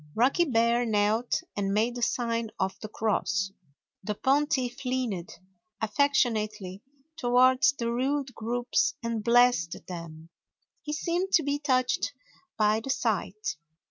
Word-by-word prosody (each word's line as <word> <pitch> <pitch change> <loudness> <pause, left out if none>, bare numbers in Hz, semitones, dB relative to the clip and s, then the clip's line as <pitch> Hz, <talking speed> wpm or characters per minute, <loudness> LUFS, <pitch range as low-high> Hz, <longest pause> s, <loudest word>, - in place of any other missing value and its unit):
Rocky 265 +9 +3
Bear 235 -3 +2
knelt 220 +1 +1
and 195 -1 -1
made 225 +3 +2
the 245 - -6
sign 230 -2 0
of 190 0 0
the 215 - -6
cross. 195 -3 -1 0.5
The 210 +2 -3
pontiff 270 0 0
leaned 250 -9 -2 0.5
affectionately 215 -5 0 0.4
toward 255 -1 +4
the 235 -1 -1
rude 265 +2 -1
groups 240 +2 0
and 230 -2 -2
blessed 235 -8 +3
them. 165 -2 -8 0.5
He 300 - -6
seemed 350 +5 -1
to 325 - +5
be 285 +1 -1
touched 260 - +1 0.4
by 215 0 +3
the 230 - -8
sight. 215 -6 -1
235 Hz, 125 wpm, -28 LUFS, 210-260 Hz, 0.5 s, to